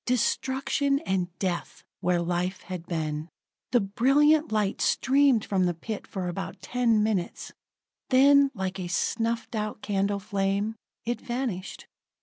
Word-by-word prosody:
Destruction 265 +3 +1
and 185 -2 0
death 185 -3 -3 0.2
where 180 0 +1
life 180 +2 -1
had 180 -2 -7
been. 155 -1 -3 0.4
The 245 -2 +4
brilliant 285 +9 +3
light 210 -2 0
streamed 270 -4 +3
from 185 -2 +1
the 175 - -1
pit 215 +5 -6
for 185 -2 -4
about 180 +2 -5
ten 235 -4 +2
minutes; 205 -5 -2 0.6
then 280 +2 +6
like 190 -1 -3
a 180 - -3
snuffed 230 +6 -1
out 215 -1 -3
candle 200 0 0
flame, 200 +1 -1 0.3
it 240 +1 -2
vanished. 240 -7 -4
210 Hz, 135 wpm, -27 LUFS, 185-250 Hz, 0.6 s, then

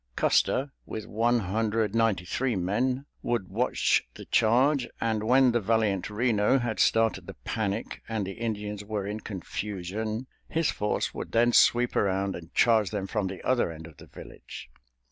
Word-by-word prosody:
Custer 135 +2 +2
with 110 - -6
one 115 +3 +1
hundred 110 +2 0
ninety 110 -6 +1
three 125 +6 -1
men 125 +9 0 0.2
would 120 -6 -2
watch 120 +6 +2
the - - -10
charge, 125 +4 +3
and 110 -2 0
when 125 +2 +5
the 120 - +2
valiant 110 -3 0
Reno 105 +2 +2
had 120 -5 -2
started 115 0 +2
the - - -8
panic 110 0 -3
and 110 -3 -1
the 95 - -5
Indians 105 -1 -4
were 105 -1 -3
in 105 +2 -4
confusion, 105 +3 -4 0.2
his 165 -1 +1
force 105 0 -1
would - - -6
then 120 +1 +4
sweep 120 0 +4
around 95 0 +1
and 80 -1 -10
charge 110 -4 +4
them 100 -3 -3
from 100 0 -2
the 95 0 -7
other 125 -9 +1
end 80 0 -9
of 80 -3 -14
the - - -14
village. - - -11
110 Hz, 165 wpm, -27 LUFS, 100-120 Hz, 0.2 s, when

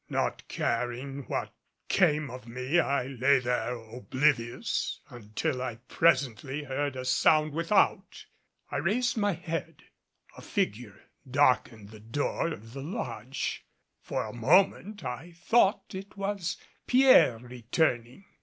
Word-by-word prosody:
Not - - -2
caring 125 +3 -2
what - - -3 0.3
came 150 -3 +2
of 125 -1 -9
me 130 +7 0
I 140 -5 +1
lay 135 +1 +3
there 125 -1 -1
oblivious, 120 +2 -1
until 120 +2 -3
I 125 -3 -3
presently 135 -2 +1
heard 140 0 -2
a 130 0 -5
sound 155 +3 +3
without. 170 +6 +1 0.5
I - - -1
raised 240 +6 +1
my 205 -3 +1
head, 165 -2 -5 0.5
a - - -11
figure 105 -2 -3 0.3
darkened 125 -6 +2
the 110 0 -12
door 115 +9 -2
of 115 -8 -7
the 135 - -6
lodge. 140 - -4 0.4
For - - -3
a 105 - -7
moment, 185 - +2
I 130 +8 -6
thought 200 +4 +2
it 195 +2 -8
was 195 -3 -2 0.3
Pierre 250 - +6
returning. 125 - -2
135 Hz, 125 wpm, -29 LUFS, 120-165 Hz, 0.5 s, Pierre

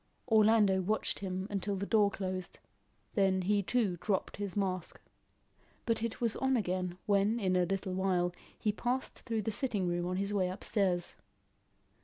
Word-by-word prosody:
Orlando 215 -4 +5
watched 215 +4 0
him 190 0 -3
till 200 +2 -1
the 195 +1 -3
door 210 -1 +4
closed, 185 -2 -4 0.6
then 190 -2 +2
he 205 +2 +2
too 200 -4 0
dropped 200 -3 -1
his 200 -2 -4
mask. 185 -4 -2 0.9
But 230 -2 0
it 230 -1 -3
was 230 -2 +1
on 265 -1 +2
again, 180 -3 -2
when 205 +3 +2
in 185 -4 +1
a 180 -1 +3
little 195 0 -2
while 185 -2 +1 0.2
he 215 - +1
passed 245 +5 -2
through 225 -3 -2
the 220 - -1
sitting 205 -5 0
room 175 0 -1
on 180 - -1
his 200 +1 -1
way 185 -3 +1
upstairs. 185 -2 -1
195 Hz, 165 wpm, -32 LUFS, 185-215 Hz, 0.9 s, Orlando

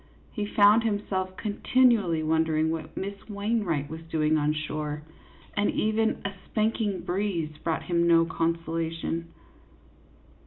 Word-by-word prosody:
He 210 -3 -3
found 210 +2 +5
himself 195 -4 -2
continually 210 -6 +2
wondering 160 0 +2
what 160 -1 -5
Miss 200 +1 -3 0.2
Wain 210 +2 0
wright 155 -6 -1
was 160 +2 -7
doing 155 -1 +2
on 150 -1 +2
shore; 150 -1 -3 0.5
and 205 0 +2
even 220 +1 0
a 200 - -2
spanking 215 -2 0
breeze 175 -5 -2
brought 165 -1 -1
him 170 -1 +1
no 165 -1 +5
consolation. 165 0 -2
170 Hz, 125 wpm, -27 LUFS, 160-205 Hz, 0.5 s, found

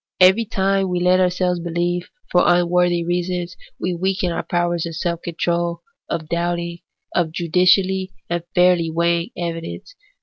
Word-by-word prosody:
Every 190 +5 +6
time 195 -3 0
we 180 -1 0
let 180 +1 +4
ourselves 180 -1 +1
believe 175 +1 -2 0.2
for 180 - +5
unworthy 175 0 +3
reasons, 175 0 -2 0.2
we 180 - -1
weaken 185 0 -1
our - - -2
powers 175 -1 -1
of 165 - -6
self 170 0 -2
control, 170 0 -2 0.3
of 160 -2 -3
doubting, 170 +1 -2 0.3
of 170 -3 +1
judicially 185 +3 +2 0.2
and 175 0 -1
fairly 180 -2 +4
weighing 170 +3 +1
evidence. 170 - -5
175 Hz, 140 wpm, -21 LUFS, 170-180 Hz, 0.3 s, Every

